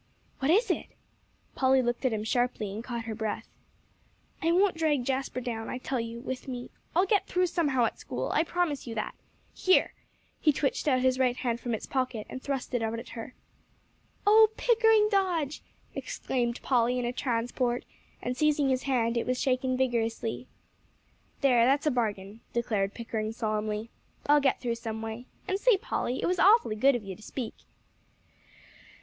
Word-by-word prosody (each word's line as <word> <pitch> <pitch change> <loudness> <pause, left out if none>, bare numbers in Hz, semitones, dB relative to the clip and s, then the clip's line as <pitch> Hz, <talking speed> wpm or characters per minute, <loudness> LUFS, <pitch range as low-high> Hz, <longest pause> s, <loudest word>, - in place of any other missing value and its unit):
"What 270 - 0
is 415 +5 +4
it?" - - -2 0.7
Polly 260 0 +3
looked 240 +2 -1
at 260 - +3
him 215 -1 -2
sharply, 235 -3 0
and 220 +3 -5
caught 235 -2 -4
her 225 - -3
breath. 220 -1 -3 0.9
"I 330 - +2
won't 375 +1 +3
drag 300 -6 +1
Jasper 265 -1 -1
down, 230 -2 -4
I - - -3
tell 255 0 -2
you, 230 0 -5
with 260 +1 -5
me. 245 -2 -6 0.2
I'll 360 +3 +5
get 405 0 +2
through 365 0 +2
somehow 290 -8 +1
at - - -3
school. - - -3
I 315 - +3
promise 330 -6 -1
you 230 - -5
that. 215 - -3 0.4
Here!" 370 - +3 0.5
He 305 - +4
twitched 285 +1 -1
out 255 -3 +3
his 260 0 +2
right 250 -1 +2
hand 235 -2 -1
from 240 -2 -2
its - - -6
pocket, 255 -5 -2
and 260 - -6
thrust 270 -2 -3
it 245 - +1
out 225 0 -1
at 230 - -8
her. 230 +1 -8 0.9
"Oh 435 +1 +7
Pickering 445 -3 +4
Dodge!" 350 -8 +1 0.3
exclaimed 240 -2 -2
Polly 245 -1 +2
in 250 - -1
a 240 - -1
transport, 245 -1 -1 0.4
and 250 - -2
seizing 295 -1 +2
his 260 -1 +1
hand, 240 -3 +1
it 235 - -1
was 250 0 0
shaken 255 -1 +1
vigorously. 235 -2 -1 0.9
"There, 250 -4 +5
that's 275 +4 +3
a 305 - +3
bargain," 215 -3 -2
declared 215 -4 0
Pickering 225 -2 -3
solemnly. 215 0 -2 0.3
"I'll 295 0 +5
get 270 -1 +2
through 240 -2 -1
someway. 225 +1 -5 0.2
And 385 +1 0
say, 480 -2 +5
Polly, 260 - -2
it - - +2
was 360 0 +1
awfully 400 - +5
good 265 +5 +4
of 240 - -3
you 195 -2 -6
to 215 - -17
speak." 235 +2 -5
250 Hz, 180 wpm, -29 LUFS, 230-290 Hz, 0.9 s, Oh